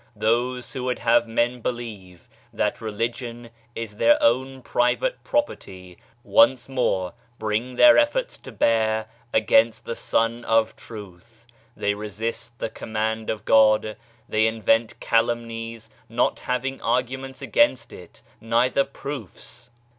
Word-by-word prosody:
Those 120 Hz, +4 st, 0 dB
who 130 Hz, -2 st, -4 dB
would 125 Hz, -1 st, -1 dB
have 120 Hz, 0 st, +3 dB
men 120 Hz, +2 st, 0 dB
believe 105 Hz, -8 st, -6 dB, 0.2 s
that -, -, -1 dB
religion 115 Hz, +2 st, -4 dB, 0.2 s
is 110 Hz, -2 st, -6 dB
their 295 Hz, 0 st, +5 dB
own 135 Hz, -, +1 dB
private 125 Hz, -, 0 dB
property 95 Hz, -, -3 dB, 0.2 s
once 130 Hz, -2 st, +4 dB
more 115 Hz, -8 st, -1 dB, 0.2 s
bring 110 Hz, +4 st, -2 dB
their 300 Hz, -, +8 dB
efforts 470 Hz, +13 st, 0 dB
to -, -, -11 dB
bear 110 Hz, -1 st, +1 dB, 0.3 s
against 110 Hz, +1 st, +3 dB
the -, -, -3 dB
Sun 115 Hz, +1 st, 0 dB
of 115 Hz, -1 st, +2 dB
Truth: 110 Hz, +2 st, -12 dB, 0.3 s
they 100 Hz, -, 0 dB
resist 110 Hz, +3 st, -5 dB
the 110 Hz, -, -4 dB
Command 110 Hz, 0 st, -3 dB
of 110 Hz, -2 st, -3 dB
God; 110 Hz, -1 st, +4 dB, 0.3 s
they 110 Hz, +1 st, +2 dB
invent 115 Hz, 0 st, +1 dB
calumnies, 115 Hz, -1 st, -1 dB, 0.2 s
not 115 Hz, +2 st, 0 dB
hav 125 Hz, 0 st, -2 dB
ing 135 Hz, 0 st, -4 dB
arguments 130 Hz, +2 st, -2 dB
against 290 Hz, -, +2 dB
it, 90 Hz, -, -14 dB, 0.2 s
neither 120 Hz, +4 st, +2 dB
proofs. 135 Hz, -, -9 dB
115 Hz, 125 wpm, -24 LUFS, 110-125 Hz, 0.3 s, their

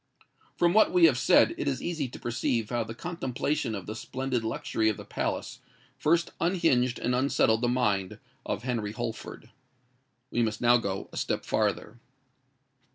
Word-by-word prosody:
From 175 Hz, 0 st, +3 dB
what 215 Hz, +1 st, +5 dB
we 180 Hz, -2 st, +6 dB
have 130 Hz, -6 st, +4 dB
said, 115 Hz, -4 st, +5 dB
it -, -, -2 dB
is 135 Hz, -2 st, 0 dB
easy 160 Hz, -6 st, -2 dB
to 125 Hz, -, -10 dB
perceive 120 Hz, -1 st, -1 dB
how 120 Hz, -1 st, 0 dB
the 115 Hz, +1 st, -8 dB
contemplation 145 Hz, -5 st, -2 dB
of 95 Hz, -3 st, -6 dB
the 110 Hz, -, -5 dB
splendid 130 Hz, +1 st, -3 dB
luxury 110 Hz, 0 st, 0 dB
of 105 Hz, -, -2 dB
the -, -, -9 dB
palace -, -, -3 dB, 0.4 s
first 170 Hz, +2 st, +2 dB
unhinged 165 Hz, -9 st, +2 dB
and 125 Hz, -, -1 dB
unsettled 125 Hz, -3 st, +2 dB
the 120 Hz, -, +2 dB
mind 105 Hz, -7 st, 0 dB, 0.3 s
of -, -, -3 dB
Henry 115 Hz, -5 st, -2 dB
Holford. -, -, -6 dB, 0.8 s
We 120 Hz, -, +1 dB
must 110 Hz, -2 st, -1 dB
now 120 Hz, 0 st, +5 dB
go 100 Hz, -4 st, -3 dB
a -, -, -7 dB
step -, -, -2 dB
farther. 120 Hz, -, -1 dB
120 Hz, 165 wpm, -28 LUFS, 110-140 Hz, 0.8 s, we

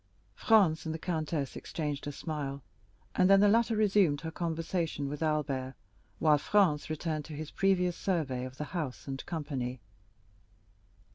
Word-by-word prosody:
Franz 165 Hz, -, +3 dB
and 160 Hz, -, -2 dB
the -, -, -3 dB
countess 155 Hz, -4 st, -2 dB
exchanged 150 Hz, -3 st, -4 dB
a -, -, -2 dB
smile, 140 Hz, -3 st, -4 dB, 0.5 s
and 185 Hz, -, +3 dB
then 195 Hz, 0 st, +7 dB
the 205 Hz, -, +6 dB
latter 230 Hz, +2 st, +3 dB
resumed 195 Hz, -9 st, +3 dB
her 160 Hz, -, -5 dB
conversation 165 Hz, -3 st, -2 dB
with 145 Hz, +2 st, -5 dB
Albert, 140 Hz, -4 st, -1 dB, 0.4 s
while 150 Hz, -2 st, +4 dB
Franz 170 Hz, -6 st, +2 dB
returned 155 Hz, -1 st, -2 dB
to 160 Hz, -, -9 dB
his 155 Hz, 0 st, -6 dB
previous 180 Hz, -2 st, +2 dB
survey 150 Hz, -10 st, -1 dB
of 130 Hz, 0 st, -7 dB
the -, -, -3 dB
house 150 Hz, -8 st, -4 dB
and 135 Hz, -1 st, -4 dB
company. 135 Hz, -6 st, -3 dB
155 Hz, 150 wpm, -31 LUFS, 145-180 Hz, 0.5 s, then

